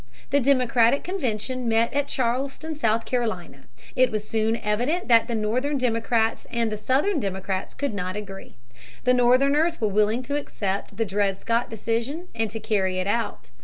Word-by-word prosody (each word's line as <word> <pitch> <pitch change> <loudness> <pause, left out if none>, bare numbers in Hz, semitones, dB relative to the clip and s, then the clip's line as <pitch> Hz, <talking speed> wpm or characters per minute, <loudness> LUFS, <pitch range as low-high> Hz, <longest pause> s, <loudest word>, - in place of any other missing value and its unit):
The 285 - +4
Democratic 250 -1 +3
convention 255 - -2
met 225 +1 +2
at 285 0 0
Charleston, 270 +5 -2
South 230 -5 +1
Carolina. 185 - -3 0.3
It 255 0 +4
was 215 -1 -3
soon 225 +1 +1
evident 245 +13 -1
that 230 -1 +6
the 235 - -2
Northern 250 +7 0
Democrats 230 -2 0
and 230 -2 -1
the - - -1
Southern 280 - +1
Democrats 190 -2 -3
could 280 -4 -2
not 185 -1 -3
agree. 195 -2 -8 0.5
The 250 - +4
Northerners 275 +7 +3
were 220 - +1
willing 215 +4 +2
to 285 +3 -2
accept 200 -7 -4
the 225 - +1
Dred 195 -1 0
Scott 230 +1 0
decision 230 - -3
and 225 -1 -1
to 225 - -6
carry 190 -4 0
it 185 - -1
out. 225 - -2
230 Hz, 165 wpm, -25 LUFS, 210-260 Hz, 0.5 s, that